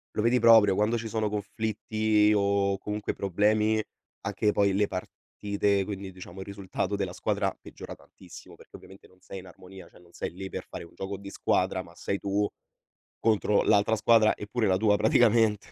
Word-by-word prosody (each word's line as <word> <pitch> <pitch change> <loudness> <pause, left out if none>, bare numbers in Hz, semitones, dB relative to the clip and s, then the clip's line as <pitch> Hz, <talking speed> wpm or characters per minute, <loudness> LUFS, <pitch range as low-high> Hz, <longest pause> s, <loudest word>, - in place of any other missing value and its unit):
lo 105 - 0
vedi 120 +2 +3
proprio, 110 -4 +6
quando 105 +4 +1
ci 115 0 -5
sono 110 -1 -1
conflitti 105 +1 0
o 100 -1 +1
comunque 105 0 -4
problemi, 105 +3 +1 0.4
anche 105 -1 0
poi 100 -1 +2
le 100 +2 +2
partite, 100 +1 -2
quindi 100 -1 -6
diciamo 90 0 -11
il 95 - -7
risultato 100 0 -3
della 95 -3 -3
squadra - - -1
peggiora - - -10
tantissimo, - - -15
perché - - -14
ovviamente 95 +1 -16
non 95 0 -25
sei 95 - -9
in 95 - -15
armonia, 95 +1 -13
cioè - - -20
non 85 -1 -21
sei - - -5
lì 95 +2 -7
per - - -6
fare - - -8
un 85 - -17
gioco 95 0 -6
di 100 0 -10
squadra, 95 -1 0
ma 85 - -16
sei 100 +2 -3
tu 100 +1 -1 0.7
contro 105 -2 +2
l'altra 105 +2 +3
squadra 110 0 +4
e 105 - -8
pure 115 +1 -1
la 95 -2 +3
tua 105 0 +3
praticamente. 110 -1 +3
100 Hz, 185 wpm, -27 LUFS, 95-110 Hz, 0.7 s, proprio